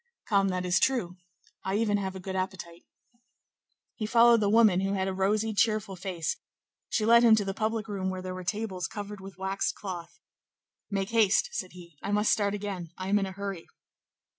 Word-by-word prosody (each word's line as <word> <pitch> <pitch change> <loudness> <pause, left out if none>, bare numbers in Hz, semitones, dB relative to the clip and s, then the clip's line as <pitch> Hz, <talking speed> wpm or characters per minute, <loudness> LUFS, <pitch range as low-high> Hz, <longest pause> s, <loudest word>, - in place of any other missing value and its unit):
"Come, 200 -2 +3
that 185 -1 -1
is 180 +1 +3
true; 190 -9 0 0.5
I 190 +1 -1
even 210 -1 +2
have 190 -1 -3
a - - -6
good 190 +1 -5
appetite." 185 -3 -5 1.1
He 215 - -4
followed 235 +1 +6
the 205 -1 +1
woman, 215 -4 +5
who 195 +1 0
had 190 -1 0
a 190 - -1
rosy, 210 +3 +1
cheerful 215 -2 +1
face; 175 -3 -3 0.5
she 215 - 0
led 235 +1 +7
him 230 -2 +7
to 210 -2 0
the 195 - -2
public 220 +1 -2
room 195 -3 -2
where 185 0 -5
there 185 0 -4
were 185 0 -6
tables 190 -2 -3
covered 205 -1 -7
with 190 -2 -10
waxed 190 +1 -1
cloth. 175 -3 -7 0.7
"Make 195 0 -2
haste!" 220 -3 +3
said 185 -5 -5
he; 170 -5 -14
"I 200 - -3
must 210 +1 +3
start 205 -1 +1
again; 195 -5 -5
I 185 0 -4
am 205 +1 +4
in 195 - -1
a - - -6
hurry." 195 -3 -6
195 Hz, 200 wpm, -28 LUFS, 185-215 Hz, 1.1 s, led